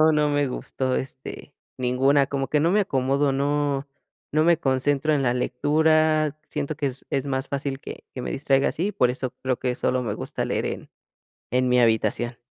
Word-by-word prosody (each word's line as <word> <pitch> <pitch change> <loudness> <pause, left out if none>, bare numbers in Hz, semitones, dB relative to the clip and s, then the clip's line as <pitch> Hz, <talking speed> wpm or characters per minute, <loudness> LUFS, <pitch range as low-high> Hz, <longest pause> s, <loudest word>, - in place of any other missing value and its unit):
no, 155 0 +6
no 150 -1 +2
me 145 -1 +1
gustó, 130 0 -2
este, 130 +2 -6 0.3
ninguna, 135 +3 +3
como 135 -1 -1
que 150 - +1
no 165 +3 +3
me 210 +2 +4
acomodo, 135 -3 +1
no 140 0 0 0.4
no 155 +1 +3
me 170 -1 +4
concentro 140 +2 +1
en 140 - +1
la 120 -2 +2
lectura, 155 +3 +2
siento 150 +1 -2
que 145 -2 -1
es 130 0 -6
es 135 0 -1
más 135 0 -2
fácil 140 -1 -3
que - - -9
que 125 - -5
me - - -4
distraiga 135 -1 +2
así, 195 +6 -1
por 125 - +3
eso 130 -1 -4
creo 130 -1 0
que 125 -1 -1
solo 125 +1 0
me 110 -4 -2
gusta - - -4
leer - - -1
en - - -5 0.6
en 125 +1 +2
mi 125 0 +4
habitación. 115 +1 +1
140 Hz, 195 wpm, -24 LUFS, 130-150 Hz, 0.6 s, no